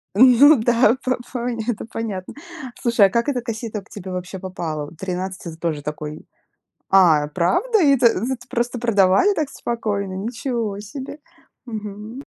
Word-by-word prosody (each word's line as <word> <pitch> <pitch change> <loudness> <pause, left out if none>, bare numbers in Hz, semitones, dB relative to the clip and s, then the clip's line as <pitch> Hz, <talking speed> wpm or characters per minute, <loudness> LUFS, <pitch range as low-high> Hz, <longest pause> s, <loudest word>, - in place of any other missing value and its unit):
М, 250 +3 +7
ну 290 +2 +9
да, 235 0 +3
по 255 0 0 0.2
поня 240 -2 -3
это 235 -3 -2
понятно. 215 -5 -5 0.5
Слушай, 235 -4 +4
а - - -6
как 235 +7 0
эта 255 -3 -1
кассета 225 -3 -5
к - - -24
тебе 190 -2 -8
вообще 180 +1 -5
попала? 165 -5 -4
Вот 155 - -14
13- 185 +1 -4
это 170 - -6
з 160 - -12
тоже 160 -3 -2
такой. 150 +1 -6 0.7
А, 165 -6 +5
правда? 355 - +1
И 280 -3 +6
это 240 -1 +4
это 250 +4 0
просто 240 +1 -2
продавали 225 - +3
так 300 -3 -2
спокойно? 205 -5 -3
Ничего 225 0 -3
себе. 265 +7 -8 0.5
Мгм. 215 +2 -7
215 Hz, 165 wpm, -21 LUFS, 185-245 Hz, 0.7 s, ну